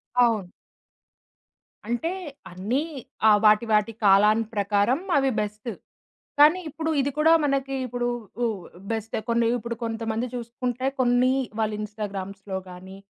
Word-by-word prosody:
అవును. 225 Hz, -7 st, +3 dB, 1.4 s
అంటే 240 Hz, +8 st, -1 dB, 0.4 s
అన్నీ 210 Hz, +10 st, -1 dB, 0.5 s
ఆ -, -, +8 dB
వాటి 215 Hz, +2 st, +5 dB
వాటి 210 Hz, +1 st, +2 dB
కాలం 210 Hz, +3 st, +6 dB
ప్రకారం 205 Hz, -, +1 dB, 0.2 s
అవి 270 Hz, -1 st, +2 dB
బెస్టు. 210 Hz, +3 st, -5 dB, 0.7 s
కానీ 310 Hz, +5 st, +7 dB
ఇప్పుడు 320 Hz, +2 st, -3 dB
ఇది 280 Hz, -, -1 dB
కూడా 320 Hz, +2 st, +5 dB
మనకి 275 Hz, -1 st, 0 dB
ఇప్పుడు 245 Hz, 0 st, -2 dB, 0.4 s
ఆహ్, 200 Hz, -6 st, -3 dB, 0.3 s
బెస్టే. 225 Hz, -1 st, -2 dB
కొన్ని 235 Hz, 0 st, +2 dB
ఇప్పుడు 235 Hz, +2 st, -5 dB
కొంతమంది 225 Hz, +1 st, -2 dB
చూసుకుంటే, 245 Hz, +1 st, -4 dB
కొన్ని 250 Hz, +1 st, +3 dB, 0.3 s
వాళ్ళ 215 Hz, -1 st, +1 dB
ఇన్‌స్టాగ్రామ్స్‌లో 200 Hz, -2 st, -5 dB
గానీ, 185 Hz, +2 st, -11 dB
225 Hz, 120 wpm, -25 LUFS, 205-250 Hz, 1.4 s, ఆ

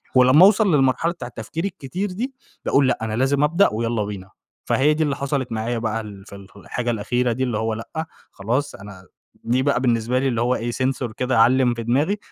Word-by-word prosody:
ولمّا 130 Hz, +8 st, +7 dB
أوصل 200 Hz, -4 st, +4 dB
للمرحلة 135 Hz, +5 st, +2 dB
بتاع 170 Hz, -, -8 dB
التفكير 120 Hz, +7 st, -6 dB
الكتير 185 Hz, +2 st, -4 dB
دي، 250 Hz, +8 st, -4 dB, 0.3 s
باقول 140 Hz, -1 st, +3 dB
لأ -, -, +1 dB
أنا 110 Hz, -1 st, -3 dB
لازم 135 Hz, +4 st, +1 dB
أبدأ 170 Hz, +7 st, +4 dB
ويالّا 115 Hz, 0 st, -1 dB
بينا. 100 Hz, -2 st, -7 dB, 0.4 s
فهي 145 Hz, +3 st, +3 dB
دي 155 Hz, +1 st, 0 dB
اللي 145 Hz, -2 st, 0 dB
حصلت 140 Hz, -3 st, -2 dB
معايا 115 Hz, +2 st, -2 dB
بقى 115 Hz, 0 st, -2 dB
ال 100 Hz, -3 st, -11 dB
في 100 Hz, -, -11 dB
ال 100 Hz, -1 st, -12 dB
في -, -, -26 dB
الحاجة 120 Hz, +4 st, -3 dB
الأخيرة 120 Hz, +3 st, 0 dB
دي، 125 Hz, +3 st, -1 dB
اللي 120 Hz, -4 st, -1 dB
هو 110 Hz, 0 st, -1 dB
لأ، 160 Hz, +8 st, -5 dB, 0.3 s
خلاص 120 Hz, +9 st, -2 dB
أنا 100 Hz, -2 st, -12 dB, 0.4 s
دي 125 Hz, +3 st, +1 dB
بقى 140 Hz, -2 st, +2 dB
بالنسبة 120 Hz, 0 st, +1 dB
لي 135 Hz, -, 0 dB
اللي 120 Hz, -3 st, 0 dB
هو 125 Hz, +1 st, +2 dB
إيه، 120 Hz, +1 st, -3 dB
sensor 130 Hz, -2 st, -2 dB
كده 125 Hz, -2 st, +1 dB
علِّم 125 Hz, +1 st, +4 dB
في 115 Hz, -1 st, -5 dB
دماغي، 145 Hz, -, +1 dB
125 Hz, 215 wpm, -22 LUFS, 115-140 Hz, 0.4 s, ولمّا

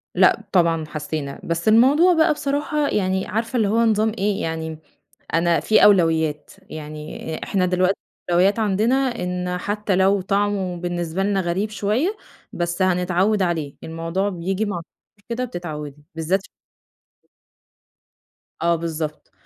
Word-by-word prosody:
لأ -, -, +4 dB
طبعًا 165 Hz, -3 st, +2 dB
حسّينا. 150 Hz, -2 st, -5 dB
بس 170 Hz, +3 st, -2 dB
الموضوع 275 Hz, +11 st, +6 dB
بقى 320 Hz, -1 st, +4 dB
بصراحة 290 Hz, +1 st, -1 dB
يعني 190 Hz, -1 st, 0 dB
عارفة 225 Hz, +3 st, -2 dB
اللي 220 Hz, -3 st, +2 dB
هو 215 Hz, +3 st, +1 dB
نظام 220 Hz, 0 st, +2 dB
إيه، 205 Hz, +1 st, 0 dB
يعني 160 Hz, -1 st, -3 dB, 0.6 s
أنا 165 Hz, -1 st, +3 dB
في 215 Hz, +8 st, +4 dB
أولويّات، 160 Hz, -6 st, +3 dB, 0.2 s
يعني 155 Hz, +1 st, -7 dB
إحنا 190 Hz, -3 st, +1 dB
دلوقتي 185 Hz, +1 st, +1 dB, 0.3 s
الأولويّات 185 Hz, +5 st, +3 dB
عندنا 215 Hz, +3 st, +2 dB, 0.3 s
إن 180 Hz, 0 st, -2 dB
حتّى 205 Hz, 0 st, -1 dB
لو 190 Hz, +1 st, +3 dB
طعمه 195 Hz, -1 st, 0 dB
بالنسبة 175 Hz, 0 st, -2 dB
لنا 200 Hz, 0 st, +1 dB
غريب 190 Hz, +4 st, -1 dB
شوية 215 Hz, -, 0 dB, 0.4 s
بس 175 Hz, +1 st, -2 dB
هنتعوِّد 185 Hz, +3 st, +2 dB
عليه، 165 Hz, -6 st, -2 dB
الموضوع 165 Hz, +4 st, -2 dB
بييجي 190 Hz, +2 st, -2 dB
مع 205 Hz, -4 st, -3 dB
التكرار 165 Hz, -, -12 dB, 0.4 s
كده 240 Hz, +2 st, -2 dB
بتتعوِّدي 150 Hz, -, -7 dB
بالذات 165 Hz, +4 st, 0 dB, 2.2 s
آه 170 Hz, 0 st, +3 dB
بالضبط. 160 Hz, -2 st, -5 dB
185 Hz, 130 wpm, -22 LUFS, 165-210 Hz, 2.2 s, الموضوع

